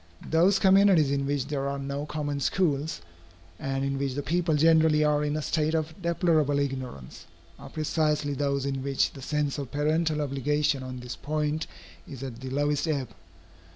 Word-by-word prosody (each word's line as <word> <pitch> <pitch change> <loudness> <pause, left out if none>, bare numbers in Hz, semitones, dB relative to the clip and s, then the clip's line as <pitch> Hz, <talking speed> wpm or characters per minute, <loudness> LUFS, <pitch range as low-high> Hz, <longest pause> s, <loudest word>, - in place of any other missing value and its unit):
Those 175 +5 +4
communities 190 -7 +5
in 140 -1 0
which 140 -2 -1
there 140 -2 -2
are 140 - -3
no 140 +2 -4
common 145 -2 -3
schools, 150 - 0 0.6
and 135 0 -2
in 135 0 -2
which 135 -2 -2
the 145 - -3
people 170 0 +1
generally 160 0 +4
are 150 0 +2
in 150 +1 -1
a 155 - -3
state 155 +1 0
of 160 0 -1
deplorable 165 -4 +2
ignorance, 130 - -4 0.3
are - - -10
precisely 150 -2 0
those 140 0 -1
in 135 -1 -2
which 135 0 +1
the 135 - -10
sense 150 +1 -1
of 140 -3 -5
parental 155 +1 +1
obligation 145 0 0
on 130 -1 -7
this 125 -1 -6
point 150 +3 -2 0.4
is 135 -1 -8
at 125 -4 -6
the 130 0 -6
lowest 145 +3 0
ebb. 140 -6 -1
145 Hz, 175 wpm, -27 LUFS, 140-155 Hz, 0.6 s, communities